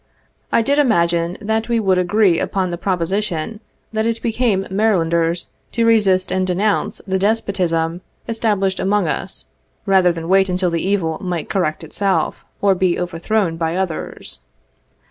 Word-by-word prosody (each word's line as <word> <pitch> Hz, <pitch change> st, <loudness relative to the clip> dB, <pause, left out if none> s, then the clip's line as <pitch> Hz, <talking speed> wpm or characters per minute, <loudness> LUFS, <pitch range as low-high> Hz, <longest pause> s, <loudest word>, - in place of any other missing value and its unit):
I 230 Hz, -, +3 dB
did 285 Hz, +4 st, +2 dB
imagine 170 Hz, -8 st, +2 dB
that 220 Hz, +2 st, -1 dB
we 235 Hz, -1 st, +2 dB
would 190 Hz, -4 st, +2 dB
agree 180 Hz, -1 st, +3 dB
upon 185 Hz, -2 st, -1 dB
the 175 Hz, -, -3 dB
proposition 190 Hz, +1 st, -2 dB, 0.3 s
that 220 Hz, +1 st, 0 dB
it 230 Hz, 0 st, -1 dB
became 225 Hz, -4 st, +1 dB
Marylauders 170 Hz, -5 st, +1 dB, 0.3 s
to 230 Hz, -1 st, +1 dB
resist 195 Hz, -5 st, +3 dB
and 185 Hz, 0 st, 0 dB
denounce 200 Hz, +4 st, 0 dB
the 190 Hz, -1 st, 0 dB
despotism 180 Hz, -5 st, 0 dB, 0.3 s
established 205 Hz, -4 st, 0 dB
among 205 Hz, +2 st, +1 dB
us, -, -, -4 dB, 0.4 s
rather 190 Hz, -3 st, +4 dB
than 165 Hz, -1 st, -5 dB
wait 190 Hz, +1 st, +4 dB
until 180 Hz, -1 st, 0 dB
the 165 Hz, -1 st, -1 dB
evil 185 Hz, -4 st, 0 dB
might 180 Hz, -4 st, -3 dB
correct 165 Hz, -5 st, -1 dB
itself, 195 Hz, +4 st, -1 dB, 0.2 s
or 200 Hz, -1 st, +5 dB
be 185 Hz, -1 st, +1 dB
over 175 Hz, -2 st, -4 dB
thrown 190 Hz, -3 st, 0 dB
by 165 Hz, 0 st, -1 dB
others. 185 Hz, -4 st, -3 dB
190 Hz, 150 wpm, -19 LUFS, 170-210 Hz, 0.4 s, or